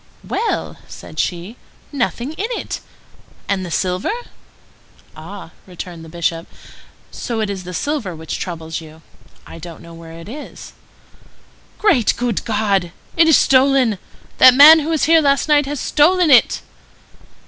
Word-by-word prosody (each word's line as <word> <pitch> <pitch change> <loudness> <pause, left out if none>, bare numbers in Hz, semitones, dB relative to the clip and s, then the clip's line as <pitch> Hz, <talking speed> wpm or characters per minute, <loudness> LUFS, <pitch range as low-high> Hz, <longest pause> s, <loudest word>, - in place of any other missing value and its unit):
"Well!" 465 - -2
said - - -11
she. 180 +7 -3 0.3
"Nothing 265 0 -2
in 395 +7 -3
it! - - -5 0.7
And 195 -2 -1
the 180 - -6
silver?" 180 +3 -2 1.1
"Ah," 170 +3 -10 0.2
returned 175 -2 -9
the 160 - -12
Bishop, 165 0 -3 0.6
"so 235 -2 -4
it 215 -2 -1
is 190 -2 -7
the 180 - -7
silver 255 - -3
which 160 0 -6
troubles 165 -2 -5
you? 160 0 -15 0.4
I 165 - -11
don't 165 0 -10
know 170 0 -13
where 165 0 -12
it 165 +2 -11
is." 285 +7 -10 1.0
"Great, 310 - +2
good 240 -4 -2
God! 205 -5 0 0.2
It 330 0 +4
is 320 - +6
stolen! 260 -5 +3 0.4
That 255 -1 +8
man 305 +4 +9
who 310 +1 -4
was 320 -2 0
here 325 0 +5
last 280 -1 +1
night 295 -2 +3
has 290 -1 -4
stolen 335 +2 +3
it." 245 -4 +4
215 Hz, 150 wpm, -18 LUFS, 170-285 Hz, 1.1 s, man